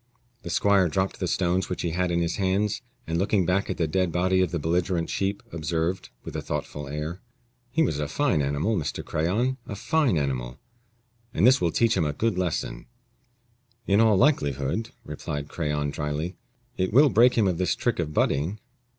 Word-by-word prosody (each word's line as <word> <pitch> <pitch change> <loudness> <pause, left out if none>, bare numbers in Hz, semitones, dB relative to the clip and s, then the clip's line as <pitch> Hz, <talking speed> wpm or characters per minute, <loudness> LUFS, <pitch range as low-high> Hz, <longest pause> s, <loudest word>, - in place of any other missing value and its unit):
The - - -7
squire 100 -3 +3
dropped 95 +3 -1
the 90 - -1
stones 90 +1 0
which 90 - -3
he 85 - -1
had 90 +2 0
in 85 0 +1
his 85 0 -2
hands, 100 +2 0 0.2
and 80 +1 -1
looking 95 -1 +2
back 95 +3 +1
at - - -2
the 85 - +1
dead 90 +3 0
body 95 +2 +2
of 90 - +2
the 85 - -2
belligerent 85 +2 0
sheep, 100 +1 -1
observed, 85 +2 -2
with - - -8
a - - -2
thoughtful 75 -1 -4
air, 75 +5 -5 0.5
"He 160 +6 +2
was 75 - 0
a 75 - -1
fine 125 - +1
animal, 70 +10 0
Mr. 80 -7 -3
Crayon 110 +12 0
a 100 - -5
fine 145 - +1
animal, 65 -4 -2 0.8
and - - +3
this 130 +2 +6
will 85 - +2
teach 115 +6 +2
him 85 -4 +1
a 75 - -1
good 115 +5 0
lesson." 85 -9 -2 1.0
"In 100 +2 +4
all 110 -3 +5
likelihood," 75 - +1 0.2
replied 75 0 -5
Crayon, 75 -3 -2
dryly, 75 +4 -3 0.4
"it 95 0 0
will 140 +6 +6
break 120 +2 +5
him 110 -4 +3
of 90 -2 0
this 90 -2 +1
trick 120 - -1
of 80 -3 -1
butting." 75 +7 0
90 Hz, 190 wpm, -26 LUFS, 75-100 Hz, 1.0 s, this